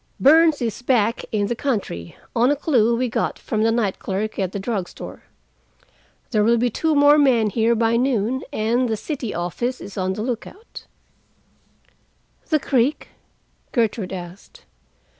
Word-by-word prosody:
"Burns 315 Hz, -1 st, +5 dB
is 230 Hz, +2 st, -3 dB
back 235 Hz, -3 st, +1 dB
in 205 Hz, -2 st, +1 dB
the 235 Hz, -, -2 dB
country, 205 Hz, -, -3 dB, 0.2 s
on 240 Hz, +2 st, +4 dB
a 290 Hz, -, +3 dB
clue 240 Hz, -6 st, +2 dB
we 255 Hz, +1 st, 0 dB
got 230 Hz, -, -2 dB
from 215 Hz, -, -3 dB
the 225 Hz, +1 st, +3 dB
night 220 Hz, -4 st, 0 dB
clerk 205 Hz, +3 st, -3 dB
at 190 Hz, -2 st, -1 dB
the -, -, -4 dB
drug 195 Hz, -3 st, -3 dB
store. -, -, -10 dB, 1.1 s
There 215 Hz, -3 st, +2 dB
will 235 Hz, +2 st, +4 dB
be 240 Hz, +1 st, +1 dB
two 315 Hz, +6 st, 0 dB
more 290 Hz, +1 st, +6 dB
men 240 Hz, -7 st, +3 dB
here 230 Hz, +1 st, +2 dB
by 230 Hz, +1 st, +2 dB
noon, 250 Hz, 0 st, 0 dB
and 235 Hz, +3 st, 0 dB
the 220 Hz, -, -1 dB
city 240 Hz, 0 st, -4 dB
office 180 Hz, +9 st, -3 dB
is 200 Hz, 0 st, -8 dB
on 185 Hz, 0 st, 0 dB
the 210 Hz, -, -4 dB
lookout." 255 Hz, -, -7 dB, 1.6 s
"The 310 Hz, -, +3 dB
creek?" 265 Hz, +1 st, 0 dB, 0.6 s
Gertrude 225 Hz, -5 st, 0 dB
asked. 190 Hz, -, -10 dB
230 Hz, 160 wpm, -22 LUFS, 210-260 Hz, 1.6 s, more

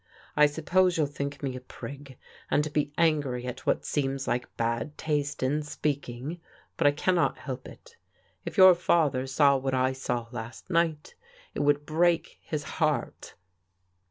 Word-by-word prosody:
"I 150 Hz, 0 st, +6 dB
sup 150 Hz, +1 st, -7 dB
pose 185 Hz, 0 st, +3 dB
you'll 155 Hz, -, +3 dB
think 140 Hz, 0 st, -5 dB
me 130 Hz, -2 st, -2 dB
a 130 Hz, -, -7 dB
prig, 130 Hz, +2 st, -10 dB, 0.3 s
and 150 Hz, 0 st, +1 dB
be 150 Hz, -1 st, 0 dB
angry 145 Hz, -7 st, +1 dB
at 125 Hz, -, -7 dB
what -, -, +1 dB
seems 135 Hz, -2 st, -1 dB
like 125 Hz, 0 st, -2 dB
bad 115 Hz, +5 st, -2 dB
taste 145 Hz, -3 st, -1 dB
in 145 Hz, +4 st, +1 dB
speaking, 145 Hz, +1 st, -4 dB, 0.3 s
but -, -, +3 dB
I -, -, +6 dB
cannot 175 Hz, +4 st, +1 dB
help -, -, -6 dB
it. 465 Hz, -2 st, -15 dB, 0.5 s
If -, -, -7 dB
your 185 Hz, -1 st, +10 dB
father 155 Hz, -7 st, +1 dB
saw 140 Hz, +1 st, +4 dB
what 135 Hz, 0 st, -1 dB
I 130 Hz, 0 st, +2 dB
saw 125 Hz, -2 st, -3 dB
last 120 Hz, +9 st, -8 dB
night, 165 Hz, -3 st, 0 dB, 0.4 s
it -, -, -4 dB
would 145 Hz, 0 st, +2 dB
break 170 Hz, +2 st, +1 dB
his 150 Hz, -2 st, -4 dB, 0.2 s
heart." 155 Hz, -2 st, -1 dB
145 Hz, 160 wpm, -28 LUFS, 130-155 Hz, 0.5 s, your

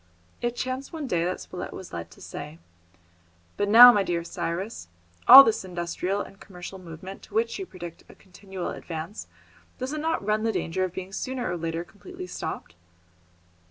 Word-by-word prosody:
It 240 Hz, 0 st, -1 dB
chanced 255 Hz, +2 st, -4 dB
one 315 Hz, -3 st, -5 dB
day 175 Hz, -9 st, 0 dB
that 180 Hz, -, -2 dB
Spilett 180 Hz, -, -7 dB
was 190 Hz, -, -9 dB
led 85 Hz, -1 st, -6 dB
to -, -, -17 dB
say, 80 Hz, -, -8 dB, 1.0 s
"But 205 Hz, 0 st, -1 dB
now, 240 Hz, +3 st, +11 dB
my 205 Hz, -, +3 dB
dear 175 Hz, -3 st, -1 dB
Cyrus, 170 Hz, -, -4 dB, 0.4 s
all 270 Hz, +2 st, +13 dB
this 225 Hz, -6 st, 0 dB
industrial 180 Hz, +2 st, -3 dB
and 195 Hz, -, -10 dB
commercial 190 Hz, 0 st, -9 dB
movement 180 Hz, +2 st, -10 dB
to 205 Hz, -, -14 dB
which 230 Hz, -, 0 dB
you 385 Hz, -, -5 dB
predict 175 Hz, -, -10 dB
a -, -, -14 dB
continual 190 Hz, -1 st, -7 dB
advance, 165 Hz, +4 st, -7 dB, 0.5 s
does 255 Hz, +3 st, -4 dB
it 305 Hz, -, -3 dB
not 325 Hz, -9 st, -1 dB
run 215 Hz, +1 st, +1 dB
the 225 Hz, 0 st, +1 dB
danger 185 Hz, -2 st, -2 dB
of 185 Hz, -, -2 dB
being 185 Hz, +1 st, -7 dB
sooner 255 Hz, +4 st, -3 dB
or -, -, -2 dB
later 165 Hz, 0 st, -3 dB
completely 365 Hz, -, -10 dB
stopped?" 160 Hz, -, -6 dB
190 Hz, 180 wpm, -26 LUFS, 175-240 Hz, 1.0 s, all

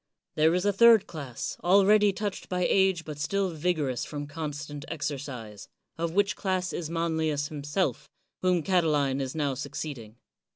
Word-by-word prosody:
There 160 Hz, +2 st, +3 dB
is 180 Hz, +2 st, 0 dB
a 205 Hz, -, +3 dB
third 230 Hz, 0 st, +7 dB
class, 140 Hz, -7 st, -6 dB
already 200 Hz, +3 st, +5 dB
touched 205 Hz, 0 st, -5 dB
by 180 Hz, -1 st, 0 dB
age, 190 Hz, -4 st, +2 dB
but 150 Hz, -2 st, -7 dB
still 195 Hz, +4 st, 0 dB
vigorous 155 Hz, -6 st, -1 dB
from 145 Hz, -1 st, -5 dB
constant 145 Hz, -1 st, -6 dB
exercise; 130 Hz, -9 st, -5 dB, 0.3 s
of 165 Hz, 0 st, -2 dB
which 205 Hz, 0 st, +2 dB
class 185 Hz, -2 st, -1 dB
is 165 Hz, -3 st, -4 dB
Manlius 160 Hz, -3 st, -1 dB
himself, 150 Hz, +5 st, -2 dB, 0.3 s
whom 180 Hz, -3 st, +2 dB
Catiline 150 Hz, -7 st, +2 dB
is 130 Hz, +1 st, -4 dB
now 145 Hz, -3 st, 0 dB
succeeding. 130 Hz, -5 st, -6 dB
160 Hz, 150 wpm, -28 LUFS, 145-185 Hz, 0.3 s, third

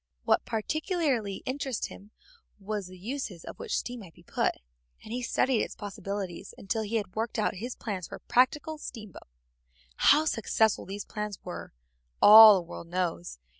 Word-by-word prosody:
What -, -, +2 dB
particularly 265 Hz, -, -1 dB
interested 265 Hz, -2 st, -3 dB
him 200 Hz, -, -13 dB, 0.5 s
was 205 Hz, -1 st, -4 dB
the 185 Hz, 0 st, -12 dB
uses 210 Hz, -, -5 dB
to -, -, -8 dB
which -, -, -2 dB
steam 245 Hz, 0 st, -4 dB
might 185 Hz, -7 st, -13 dB
be -, -, -19 dB
put, -, -, 0 dB, 0.5 s
and 220 Hz, -, -8 dB
he 250 Hz, -, -2 dB
studied 245 Hz, -1 st, +1 dB
its -, -, -4 dB
possibilities 200 Hz, -2 st, -6 dB
until 220 Hz, +3 st, -2 dB
he 220 Hz, +1 st, -3 dB
had 205 Hz, -4 st, -2 dB
worked 225 Hz, +2 st, -2 dB
out 215 Hz, -, +1 dB
his 240 Hz, +6 st, -5 dB
plans 190 Hz, -6 st, -5 dB
for -, -, -8 dB
a -, -, -12 dB
practical 295 Hz, +5 st, +1 dB
steamboat. 215 Hz, -, -9 dB, 0.7 s
How 305 Hz, +2 st, +5 dB
successful 220 Hz, -, +1 dB
those 200 Hz, +2 st, -6 dB
plans 210 Hz, -2 st, -5 dB
were 180 Hz, -, -7 dB, 0.5 s
all 215 Hz, 0 st, +11 dB
the 185 Hz, -, 0 dB
world 170 Hz, 0 st, -9 dB
knows. 170 Hz, -, -3 dB
215 Hz, 170 wpm, -28 LUFS, 195-245 Hz, 0.7 s, all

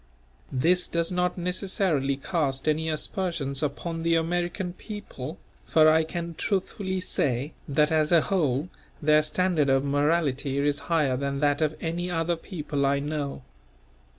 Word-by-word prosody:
This 170 Hz, +8 st, +2 dB
does 170 Hz, 0 st, 0 dB
not 180 Hz, 0 st, 0 dB
necessarily 180 Hz, -6 st, 0 dB
cast 140 Hz, -3 st, -1 dB
any 160 Hz, +1 st, +1 dB
aspersion 155 Hz, -2 st, -2 dB
upon 160 Hz, +3 st, -3 dB
the 165 Hz, 0 st, +2 dB
American 175 Hz, +2 st, -1 dB
people; 180 Hz, -, -7 dB, 0.3 s
for 155 Hz, -1 st, +5 dB
I 160 Hz, +1 st, +4 dB
can 170 Hz, +1 st, -4 dB
truthfully 190 Hz, +1 st, -2 dB
say 140 Hz, -5 st, -1 dB
that 150 Hz, +2 st, +2 dB
as 155 Hz, 0 st, +2 dB
a 170 Hz, -2 st, +6 dB
whole 150 Hz, -5 st, 0 dB, 0.3 s
their 150 Hz, 0 st, +5 dB
standard 155 Hz, -1 st, +1 dB
of 135 Hz, 0 st, +3 dB
morality 145 Hz, -1 st, +1 dB
is 145 Hz, 0 st, +1 dB
higher 150 Hz, -6 st, +2 dB
than 140 Hz, +1 st, -2 dB
that 145 Hz, +1 st, +2 dB
of 155 Hz, 0 st, +1 dB
any 175 Hz, +2 st, -2 dB
other 170 Hz, 0 st, 0 dB
people 155 Hz, -4 st, -4 dB
I 140 Hz, +1 st, +2 dB
know. 145 Hz, -2 st, -3 dB
160 Hz, 145 wpm, -26 LUFS, 140-175 Hz, 0.3 s, a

